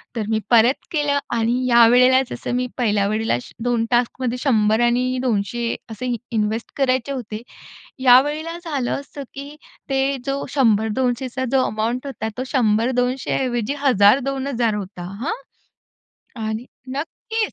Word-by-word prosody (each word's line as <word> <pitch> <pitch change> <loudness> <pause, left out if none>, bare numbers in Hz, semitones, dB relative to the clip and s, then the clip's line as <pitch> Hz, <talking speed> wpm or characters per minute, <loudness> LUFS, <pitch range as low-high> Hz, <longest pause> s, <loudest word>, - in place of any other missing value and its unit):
तर 220 -2 -2
मी 220 -1 +1
परत 235 +3 +4
केलं 290 -3 +1 0.2
आणि 235 +2 +1
यावेळेला 250 +2 +6
जसं 245 - -3
मी 250 0 0
पहिल्या 205 -4 +1
वेळेला 215 - 0 0.3
2 240 -2 +1
टास्कमध्ये 245 +1 0
100 220 -4 +3
आणि 250 +2 +1
200 230 +1 -1 0.2
असे 245 +3 -3 0.2
इन्वेस्ट 220 +1 -1
करायचे 260 -1 +1
होते. 220 -4 -6 0.6
यावेळेला 295 +6 +4
झालं 280 -7 -2
असं 280 0 -9
की 285 +2 -8 0.3
ते 270 0 +1
जो 275 0 -2
100-200चा 245 +2 +1
जो 265 -1 +4
अमाउंट 235 +5 -2
होता, 220 -5 -4
तो 255 - -2
100-200 250 +2 +1
ऐवजी 240 -1 -1
1,000-2,000 250 +1 +3
होता 190 -3 -6 0.2
हां. 340 - -1 1.1
आणि 220 +3 -4 0.3
नक्कीच. 445 +8 -3
245 Hz, 125 wpm, -21 LUFS, 225-270 Hz, 1.1 s, यावेळेला